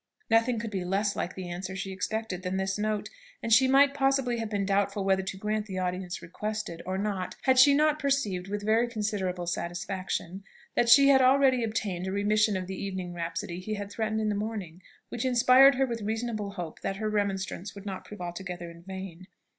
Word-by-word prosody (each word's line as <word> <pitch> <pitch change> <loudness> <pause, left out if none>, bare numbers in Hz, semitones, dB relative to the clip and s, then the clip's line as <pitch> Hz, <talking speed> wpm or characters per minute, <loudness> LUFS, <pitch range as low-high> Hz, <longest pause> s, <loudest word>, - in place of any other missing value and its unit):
Nothing 230 +2 +3
could 225 0 -4
be 190 -3 -2
less 200 +3 0
like 175 - -3
the 185 -1 -6
answer 180 +2 -5
she 195 0 -4
expected 190 0 -3
than 185 0 -2
this 190 0 -1
note, 215 0 -1 0.4
and 230 - +2
she 260 +3 +6
might 275 +1 +5
possibly 270 -3 +1
have 225 -1 -3
been 200 -2 -1
doubtful 200 0 +1
whether 190 0 +3
to 190 0 -5
grant 210 +1 -2
the 190 -2 -5
audience 180 0 -3
requested, 210 0 -5
or 190 0 -1
not, 195 -2 -2
had 260 -1 +4
she 280 +2 +8
not 305 +1 +3
perceived, 265 -11 0
with 205 +1 -4
very 225 +3 +3
considerable 205 -6 -2
satisfaction, 180 +2 -4 0.3
that 240 - +2
she 275 +3 +8
had 265 -1 +6
already 260 -1 +4
obtained 200 -5 -2
a - - -2
remission 210 +1 +2
of 185 - -4
the 190 +1 -6
evening 185 -2 -4
rhapsody 170 0 -4
he 215 +4 -4
had 205 0 -6
threatened 220 0 -1
in 215 - 0
the - - +1
morning, 200 -5 -4 0.3
which 240 - -4
inspired 260 +2 +6
her 270 +1 +2
with 235 -3 -4
reasonable 215 -1 -3
hope 175 -5 -7
that 195 - -2
her 215 +2 -3
remonstrance 200 -2 -2
would 200 0 -10
not 190 -2 -5
prove 210 -3 -10
altogether 175 -1 -6
in 170 0 -14
vain. 190 -1 -8
205 Hz, 205 wpm, -28 LUFS, 185-225 Hz, 0.4 s, she